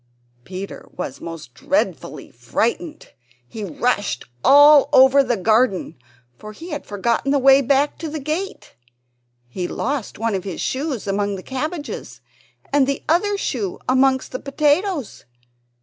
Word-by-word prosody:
Peter 190 +1 -8
was 140 -7 -6
most 165 -6 -8
dreadfully 280 - -2
frightened; 235 - -3 0.4
he 215 - -7
rushed 205 - -1 0.2
all 290 +1 +7
over 265 +2 +6
the 245 -3 -1
garden, 215 +1 +1 0.4
for 215 0 -9
he 335 +10 -10
had 295 -1 -5
forgotten 225 +6 -1
the 285 - +3
way 270 0 +6
back 280 +2 +1
to 320 - -5
the 310 - -5
gate. 310 +7 -5 0.7
He 175 +9 -4
lost 270 +2 -3
one 225 0 -1
of 190 -2 -2
his 190 -4 -6
shoes 270 -3 -3
among 200 0 -1
the 185 - -8
cabbages, 295 +4 -5 0.5
and 280 -2 +4
the 275 0 -2
other 400 +6 +2
shoe 215 - -3
amongst 260 0 +2
the 255 - -4
potatoes. 295 - -1
260 Hz, 140 wpm, -21 LUFS, 205-290 Hz, 0.7 s, all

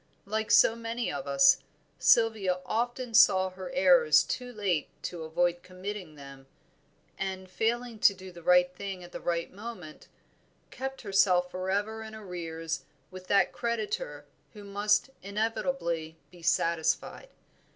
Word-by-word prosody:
Like 215 +2 -2
so 225 - +6
many 230 +1 -3
of 180 -3 -5
us, 135 0 +6 0.4
Sylvia 215 -6 +3
often 240 +1 -2
saw 190 -5 +6
her 185 +3 -8
errors 470 - +5
too 250 -1 -4
late 195 -9 -1
to 175 -2 -5
avoid 175 +2 0
committing 185 -2 -7
them, 140 -1 -12 0.7
and 190 -1 -4
failing 230 +4 -2
to 200 - +5
do 185 0 -11
the 175 -1 -12
right 180 +1 +4
thing 195 -1 -6
at 175 - -12
the - - -6
right 170 0 -2
moment, 195 -7 -9 0.6
kept 265 0 -5
herself 185 -4 +2
forever 200 +4 -2
in 220 0 -8
arrears 165 -5 -5 0.3
with 185 0 -10
that 200 - +3
creditor 235 - -3 0.3
who 210 -2 -11
must 205 +5 +1
inevitably 200 -6 -2
be 175 -1 -15
satisfied. 170 - 0
195 Hz, 135 wpm, -29 LUFS, 175-225 Hz, 0.7 s, so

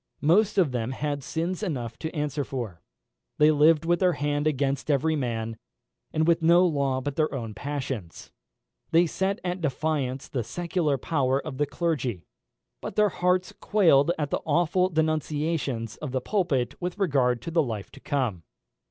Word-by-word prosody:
Most 200 +8 +3
of 175 -8 +4
them 120 0 -2
had 145 +1 -2
sins 170 +6 -2
enough 125 - -3
to 160 - -3
answer 150 -1 -1
for. 120 -11 -5 0.6
They 150 +1 +6
lived 155 +1 +4
with 175 0 +2
their 180 -2 +3
hand 145 0 -1
against 140 -1 -1
every 155 +2 +2
man, 115 -5 -3 0.5
and 160 +1 +1
with 170 -1 +3
no 170 +3 +6
law 140 -5 0
but 145 +1 -4
their 155 -1 +2
own 115 -6 -4
passions. 135 - -5 0.6
They 170 +2 +5
set 190 +4 -1
at 180 0 -3
defiance 140 -3 -1
the 125 -4 -2
secular 165 - -1
power 135 -3 +1
of 140 -2 -7
the 145 - +2
clergy; 140 - -2 0.6
but - - -6
their 210 -1 +4
hearts 180 0 +1
quailed 170 -7 +4
at 150 -2 -2
the - - 0
awful 175 +4 +2
denunciations 155 -7 -1
of 145 -4 -6
the 130 - +1
pulpit 140 - 0
with 180 +1 -3
regard 135 - +2
to 165 - -5
the 165 0 +3
life 110 -8 -4
to 140 - -13
come. 125 -12 -1
150 Hz, 170 wpm, -26 LUFS, 130-170 Hz, 0.6 s, They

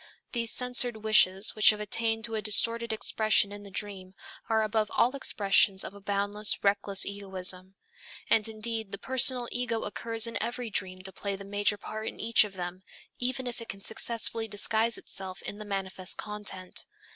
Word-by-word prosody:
These 230 -2 0
censored 245 -3 +3
wishes 200 -2 +4
which 215 - +6
have 210 - +2
attained 225 +1 -1
to 230 - -8
a 220 - -2
distorted 230 +2 +3
expression 215 -1 +2
in 205 0 -8
the 200 - -11
dream, 195 -1 -6 0.3
are 220 -1 +2
above 215 0 -1
all 245 +4 +3
expressions 195 -6 +2
of - - -7
a 200 - -13
boundless, 205 +1 -1
reckless 200 -1 +2
egoism. 190 -1 0 0.5
And 215 -1 +3
indeed, 220 -1 -3
the - - -2
personal 255 0 +4
ego 235 -2 -1
occurs 225 +2 -1
in 230 0 -4
every 240 +1 -4
dream 185 -1 -2
to 190 - -5
play 200 +1 -4
the 195 0 -10
major 205 +1 0
part 215 +2 -7
in - - -7
each 230 0 +4
of 210 -2 -7
them, 180 0 -6 0.4
even 255 +1 -2
if 245 -1 -5
it 230 - -10
can 195 - -7
successfully 225 +1 0
disguise 220 +2 0
itself 190 -1 -3
in 205 - -6
the 215 - -8
manifest 190 -2 -3
content. 210 -3 -4
210 Hz, 180 wpm, -28 LUFS, 195-230 Hz, 0.5 s, which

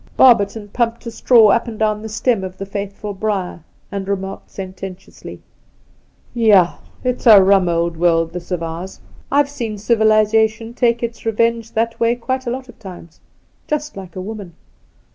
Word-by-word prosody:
Barberton 210 -4 +4
pumped 235 +2 -2
a 230 - -5
straw 230 -2 +5
up 235 +4 +1
and 225 -2 -6
down 215 -1 0
the 220 - -7
stem 220 -1 0
of 185 0 -7
the 195 - -5
faithful 200 +1 -5
briar, 195 -3 -3 0.3
and 195 -1 -4
re 200 - +1
marked 195 0 -8
sententiously: 190 -1 -9 0.9
'Yah, 210 -7 +4 0.3
it's 250 -1 -1
a 215 -3 +10
rum 190 -2 +4
old 170 0 -1
world, 165 -1 +2
this 175 -1 -7
of 180 -3 -2
ours! 165 +3 -6 0.3
I've 285 0 +3
seen 235 -7 -5
civilization 220 +1 +2
take 235 -1 +1
its 235 0 -5
revenge 230 0 0
that 230 +1 -1
way 235 +1 +2
quite 260 +1 -3
a - - +1
lot 255 +2 -5
of 245 - -16
times 180 -5 -12 0.3
— - - -40
^just 300 0 -2
like 185 -3 -10
a 185 - -5
woman 200 -4 -8
215 Hz, 175 wpm, -18 LUFS, 190-230 Hz, 0.9 s, a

